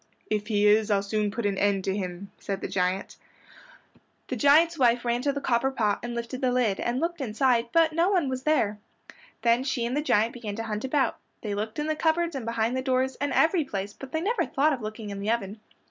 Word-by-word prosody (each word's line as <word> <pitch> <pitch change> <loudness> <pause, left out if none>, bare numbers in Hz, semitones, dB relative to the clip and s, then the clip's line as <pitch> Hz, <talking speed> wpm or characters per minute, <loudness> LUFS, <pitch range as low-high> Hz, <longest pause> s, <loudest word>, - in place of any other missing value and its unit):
"If 210 -1 -1
he 210 -2 +2
is, 210 +1 +4
I'll 200 -1 +2
soon 210 +1 -1
put 225 +2 -4
an 200 -1 0
end 200 -1 +1
to 190 0 -1
him," 185 0 -5
said 195 -1 -4
the - - -3
giant. 185 +1 -1 1.1
The - - -2
giant's 315 +3 +4
wife 240 -1 +3
ran 240 0 0
to 280 +2 +1
the 280 - -3
copper 260 0 +1
pot 215 -6 0
and 240 0 -5
lifted 235 +2 -5
the 255 -1 +2
lid, 245 -6 +1
and 240 +2 -1
looked 335 0 -2
inside 240 0 +2
it, 235 - -27
but 330 -1 +3
no 335 +3 +2
one 360 -7 +2
was 260 -1 -3
there. 225 -8 +1 0.6
Then 235 +1 +3
she 260 -3 -1
and 240 +3 -2
the 295 - +1
giant 225 -5 +2
began 220 -4 -6
to 225 - -4
hunt 215 -1 -4
about. 265 +1 0 0.2
They 210 -2 -3
looked 215 +2 -4
in 300 - -1
the 310 0 0
cupboards 330 +1 +1
and 250 -4 -5
behind 230 +1 0
the 260 - -1
doors, 260 0 0
and 285 0 -2
every 325 0 +3
place, 200 -6 -5
but 270 -1 -10
they 320 - -1
never 410 0 +1
thought 295 +3 +2
of 255 - -4
looking 215 -1 -6
in 200 - -5
the 200 +2 -3
oven. 220 -2 -2
235 Hz, 240 wpm, -26 LUFS, 210-280 Hz, 1.1 s, is